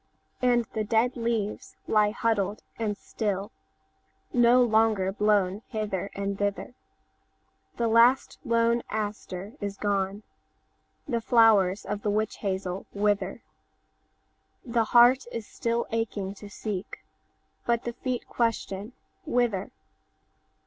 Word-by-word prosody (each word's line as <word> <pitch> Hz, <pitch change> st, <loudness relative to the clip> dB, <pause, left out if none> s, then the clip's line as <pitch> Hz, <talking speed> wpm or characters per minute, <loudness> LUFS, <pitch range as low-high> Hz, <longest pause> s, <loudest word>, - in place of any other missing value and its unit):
And 240 Hz, -2 st, +3 dB
the 215 Hz, -, -1 dB
dead 225 Hz, +4 st, +1 dB
leaves 230 Hz, -3 st, -2 dB
lie 210 Hz, -1 st, +4 dB
huddled 210 Hz, -2 st, -1 dB, 0.2 s
and 210 Hz, -3 st, -1 dB
still, 205 Hz, -1 st, -3 dB, 0.8 s
No 245 Hz, +1 st, +6 dB
longer 220 Hz, -4 st, +2 dB
blown 205 Hz, -1 st, +1 dB
hither 205 Hz, -4 st, -3 dB
and 200 Hz, 0 st, -3 dB
thither; 205 Hz, +3 st, -2 dB, 1.0 s
The 235 Hz, -, +1 dB
last 235 Hz, +3 st, +4 dB
lone 235 Hz, -2 st, +2 dB
aster 205 Hz, -2 st, -4 dB
is 200 Hz, -1 st, -4 dB
gone; 200 Hz, 0 st, -1 dB, 0.8 s
The 235 Hz, -4 st, -1 dB
flowers 215 Hz, -5 st, +4 dB
of 205 Hz, +1 st, -3 dB
the 210 Hz, -, -1 dB
witch 215 Hz, +1 st, 0 dB
hazel 190 Hz, -1 st, -3 dB
wither; 200 Hz, 0 st, 0 dB, 1.2 s
The 230 Hz, -2 st, +1 dB
heart 245 Hz, +3 st, +6 dB
is 230 Hz, -2 st, -5 dB
still 235 Hz, +2 st, -2 dB
aching 210 Hz, -4 st, -2 dB
to 205 Hz, 0 st, -11 dB
seek, 205 Hz, -2 st, -6 dB, 0.6 s
But 235 Hz, -1 st, +1 dB
the 240 Hz, -, -4 dB
feet 250 Hz, 0 st, -4 dB
question 225 Hz, -2 st, -2 dB, 0.3 s
'Whither? 230 Hz, -6 st, +1 dB
215 Hz, 115 wpm, -27 LUFS, 200-235 Hz, 1.2 s, No